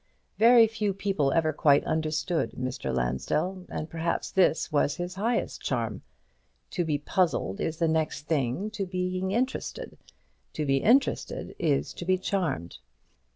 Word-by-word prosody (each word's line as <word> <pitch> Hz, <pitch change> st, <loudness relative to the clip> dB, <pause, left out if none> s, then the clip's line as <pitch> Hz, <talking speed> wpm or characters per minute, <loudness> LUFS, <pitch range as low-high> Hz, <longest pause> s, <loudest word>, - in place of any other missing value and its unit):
Very 235 Hz, 0 st, +8 dB
few 215 Hz, -3 st, -2 dB
people 195 Hz, -9 st, 0 dB
ever 155 Hz, 0 st, +2 dB
quite 145 Hz, -1 st, +4 dB
understood 160 Hz, +2 st, -1 dB
Mr. 125 Hz, -, -3 dB
Lansdell, 65 Hz, -, -1 dB
and 155 Hz, -, -4 dB
perhaps 165 Hz, +1 st, -2 dB
this 170 Hz, -4 st, +2 dB
was 145 Hz, 0 st, +2 dB
his 175 Hz, +1 st, -4 dB
highest 225 Hz, +5 st, -1 dB
charm. -, -, -2 dB, 0.7 s
To 180 Hz, -, 0 dB
be 155 Hz, -3 st, 0 dB
puzzled 145 Hz, -, 0 dB
is 160 Hz, -, -2 dB
the 165 Hz, -, +2 dB
next 160 Hz, -2 st, 0 dB
thing 155 Hz, -, -1 dB
to 200 Hz, -3 st, -3 dB
being 185 Hz, 0 st, -2 dB
interested; 255 Hz, -, -3 dB, 0.5 s
to 155 Hz, -, -2 dB
be 135 Hz, -1 st, +2 dB
interested 245 Hz, -, +1 dB
is 150 Hz, -5 st, 0 dB
to 175 Hz, -, -7 dB
be 185 Hz, +1 st, +3 dB
charmed. 170 Hz, -, -2 dB
165 Hz, 145 wpm, -27 LUFS, 145-190 Hz, 0.7 s, Very